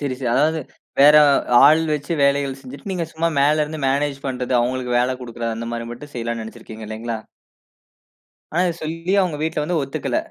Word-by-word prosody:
சரி, 140 -3 -2
சரி. 125 -3 -2
அதாவது 155 +3 +2 0.4
வேற 150 +2 +8 0.5
ஆள் 155 +3 +6
வச்சு 150 +2 -2
வேலைகள் 140 -1 +1
செஞ்சுட்டு, 140 +8 -9
நீங்க 175 -2 -2
சும்மா 165 +1 0
மேல 150 +2 +3
இருந்து 155 +1 -7
மேனேஜ் 140 +1 0
பண்றது. 125 -1 -3
அவங்களுக்கு 125 0 -1
வேல 130 +1 0
குடுக்கிறது. 115 -2 -4
அந்த 115 0 -5
மாரி 115 0 -4
மட்டும் 145 +4 -11
செய்யலான்னு 115 -1 -3
நினைச்சிருக்கீங்க 110 -1 -10
இல்லைங்களா? 110 +1 -4 1.3
ஆனா 175 +3 +2
இதை 170 - -2
சொல்லியும் 165 +5 0
உங்க 155 - -4
வீட்ல 155 -1 -1
வந்து 165 0 0
ஒத்துக்கல. 140 - -3
140 Hz, 175 wpm, -21 LUFS, 120-155 Hz, 1.3 s, வேற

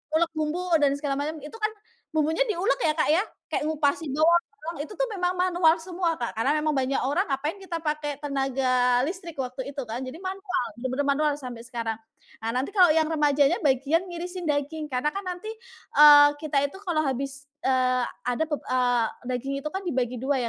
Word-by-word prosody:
ngulek 335 +1 +2
bumbu 310 +4 -1 0.2
dan 285 -1 +4
segala 285 -1 -2
macam, 310 +2 -3
itu 305 +10 -9
kan 430 +1 0 0.4
bumbunya 315 +9 +2
diulek 415 +6 +1
ya 305 - +3
Kak 310 - +1
ya, 350 +6 +4 0.3
kayak 300 - -1
ngupasin 300 -1 0
doang, 335 +3 +4 0.3
itu 365 +8 -7
tuh - - 0
memang 360 -3 0
manual 350 -3 +3
semua 350 -1 -1
Kak. 235 -4 -5
Karena 270 +6 +2
memang 305 0 +1
banyak 265 +1 0
orang 295 +9 +1
ngapain 295 +7 -2
kita 340 -4 -5
pakai 300 -2 -2
tenaga 260 -3 +1
listrik, 340 +2 -4
waktu 260 +2 -5
itu 280 - -2
kan. 230 +3 -3
Jadi 255 +4 -7
manual, 375 -4 -2 0.2
bener-bener 260 +3 -1
manual 300 +1 +2
sampai 240 -2 -7
sekarang. 230 -2 -3 0.4
Ah 225 +1 -2
nanti 255 +2 0
kalau 370 -3 +6
yang 315 0 +2
remajanya 290 -2 +3
bagian 280 +6 +2
ngirisin 355 0 -6
daging, 300 +1 -1
karena 255 +4 +1
kan 395 - -4
nanti, 365 +4 -5 0.5
eee, 290 -1 +10
kita 290 -3 0
itu 385 - -12
kalau 335 -4 +1
habis, 275 0 -3 0.2
eee, 255 -1 +2 0.2
ada 245 +6 0
pep 295 -2 -3
eee, 245 -2 +2 0.3
daging 270 +3 -4
itu - - 0
kan 385 - -2
dibagi 255 -7 -1
2 275 +1 +1
295 Hz, 185 wpm, -26 LUFS, 265-340 Hz, 0.5 s, eee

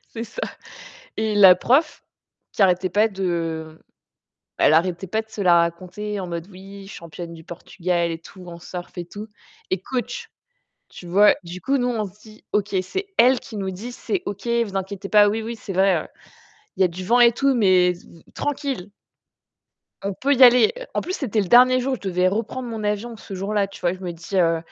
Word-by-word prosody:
C'est 230 - -3
ça, - - -8 0.7
et 220 -1 -1
la 195 -3 +9
prof 275 - +1 0.5
qui 205 - +3
arrêtait 185 0 +2
pas 210 +4 +3
de 165 -5 -3 0.8
elle - - +4
arrêtait 175 +3 +1
pas 220 +4 -1
de 220 - -12
se 215 - -5
la 175 -2 +5
raconter 185 +5 -3
en 190 - -4
mode 170 0 -6
oui, 195 +1 -12
championne 170 -2 -9
du 160 -1 -13
Portugal 175 0 -2
et 165 - -4
tout, 180 +2 -14
en 170 -1 -9
surf 175 +2 -9
et 175 - -4
tout. 205 +5 -9 0.4
Et 185 - 0
coach, 265 - -4 0.6
tu 180 - -12
vois? 200 +4 +5
Du 175 +2 -8
coup, 275 +5 0
nous, 245 -1 0
on 225 -4 -1
se 205 - -26
dit: 215 0 -17
«OK, 210 0 -1
c'est 385 - -4
elle 255 +2 +6
qui 220 - -11
nous 195 -2 -3
dit: 210 +7 -7
"C'est 370 +8 -3
OK, 205 +4 -5
vous 235 -4 0
inquiétez 195 +1 -4
pas, 210 0 +6
oui 220 +2 -1
oui, 230 +2 -5
c'est 205 -3 -8
vrai, 190 -3 +2 0.7
il - - -1
y - - +7
a - - +5
du 180 +2 -8
vent 235 +6 +3
et 240 -1 +7
tout, 270 +2 +1
mais 185 -5 +4
v 170 -1 -17
tranquille."» 275 - -3 1.2
«"On 200 - -1
peut 280 +8 +1
y 260 -1 +6
aller."» 245 -2 +7 0.2
en - - 0
plus, 365 - -5
c'était 230 - -1
le 195 - 0
dernier 255 +4 +6
jour, 260 +1 -1
je - - -14
devais 180 0 +2
reprendre 230 +5 -3
mon 225 -2 -5
avion 210 +3 -2
ce 205 - -11
jour-là, 200 +1 -1
tu 195 - -13
vois? 175 0 +1
Je 185 - -10
me 180 -2 -5
dis 170 +3 -5
heu: 165 -2 +3
195 Hz, 210 wpm, -22 LUFS, 180-230 Hz, 1.2 s, la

